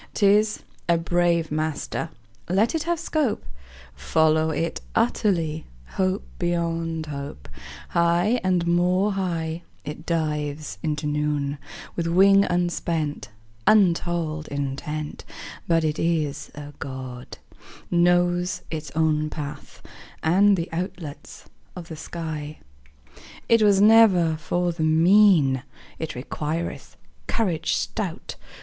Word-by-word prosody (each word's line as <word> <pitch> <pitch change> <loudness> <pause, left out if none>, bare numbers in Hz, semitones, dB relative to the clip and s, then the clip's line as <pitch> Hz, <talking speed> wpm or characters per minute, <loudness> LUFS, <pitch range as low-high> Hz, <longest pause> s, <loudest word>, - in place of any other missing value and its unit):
'Tis 210 +1 +3 0.3
a 170 - +5
brave 170 -1 +1
master; 155 +1 -2 0.4
Let 200 +6 +2
it 320 - 0
have 340 -1 0
scope: 305 -9 -1 0.5
Follow 155 - +2
it 165 +1 -2
utterly, 170 -9 +1 0.2
Hope 190 +1 0 0.2
beyond 165 -2 -1
hope: 140 - -7 0.4
High 175 +8 +2
and 180 -2 +1
more 180 +4 +2
high 170 -4 -2 0.2
It 150 +2 -7
dives 150 - -2
into 150 -1 -2
noon, 150 -1 -1 0.4
With 170 -1 -1
wing 195 +3 +5
unspent, 170 -6 -1 0.4
Untold 170 -5 +2
intent; 145 +2 -4 0.4
But 165 -1 +3
it 155 -1 -1
is 160 -4 -1
a 145 0 -8
God, 130 -2 -7 0.5
Knows 175 +1 +2
its 155 -1 -4
own 155 -1 +2
path 145 -1 -8 0.4
And 195 +5 +4
the 170 0 -2
outlets 165 -4 -6 0.3
of 175 -2 -8
the 160 - -6
sky. 155 -1 -6 0.9
It 230 -1 +5
was 205 -2 +5
never 200 -6 +6
for 175 +2 -1
the 165 -1 -6
mean; 160 -4 +5 0.4
It 160 - -4
requireth 155 +6 -4 0.3
courage 175 -8 0
stout. 195 -5 -4
165 Hz, 110 wpm, -24 LUFS, 155-180 Hz, 0.9 s, never